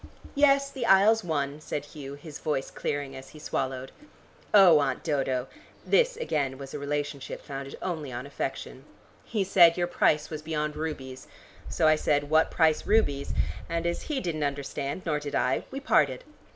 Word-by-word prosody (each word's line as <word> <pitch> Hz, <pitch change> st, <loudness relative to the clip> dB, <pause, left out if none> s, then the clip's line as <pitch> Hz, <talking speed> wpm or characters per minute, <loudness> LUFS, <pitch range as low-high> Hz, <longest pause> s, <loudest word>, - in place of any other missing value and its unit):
"Yes, 275 Hz, -1 st, +4 dB
the 250 Hz, -4 st, -3 dB
Isles 210 Hz, +3 st, +5 dB
won," 145 Hz, -3 st, -2 dB
said 145 Hz, -1 st, -4 dB
Hugh, 140 Hz, -2 st, -9 dB
his 145 Hz, +1 st, -10 dB
voice 145 Hz, -4 st, -2 dB
clearing 145 Hz, -2 st, -3 dB
as 130 Hz, 0 st, -10 dB
he 155 Hz, -, -14 dB
swallowed. 130 Hz, -3 st, -3 dB, 0.6 s
"Oh, 185 Hz, -7 st, +8 dB
Aunt 135 Hz, -3 st, -1 dB
Dodo" 135 Hz, -5 st, 0 dB, 0.4 s
this -, -, +3 dB
again 140 Hz, -, -1 dB
was 135 Hz, -1 st, -9 dB
a 150 Hz, -, -4 dB
relationship 145 Hz, -1 st, -3 dB
founded 135 Hz, -1 st, -7 dB
only 160 Hz, -7 st, -3 dB
on 120 Hz, +2 st, -5 dB
affection 135 Hz, -1 st, -5 dB, 0.4 s
"he 215 Hz, -4 st, -1 dB
said 175 Hz, -3 st, +6 dB
your 175 Hz, -, +1 dB
price 155 Hz, -3 st, +1 dB
was 155 Hz, -1 st, -5 dB
beyond 150 Hz, -1 st, -2 dB
rubies. 135 Hz, -5 st, -5 dB, 0.4 s
So 160 Hz, -, +2 dB
I 155 Hz, 0 st, +5 dB
said 145 Hz, -1 st, 0 dB
'What 160 Hz, +1 st, +4 dB
price 160 Hz, -2 st, +2 dB
rubies?' 145 Hz, -11 st, +1 dB, 0.3 s
and 170 Hz, 0 st, -2 dB
as 170 Hz, 0 st, -1 dB
he 300 Hz, -3 st, -2 dB
didn't 165 Hz, -, -2 dB
understand 140 Hz, +3 st, -3 dB
nor 150 Hz, -3 st, 0 dB
did 145 Hz, -1 st, -5 dB
I, 130 Hz, -, +1 dB
we 270 Hz, -, -5 dB
parted. 290 Hz, -, +2 dB
150 Hz, 170 wpm, -27 LUFS, 140-175 Hz, 0.6 s, Oh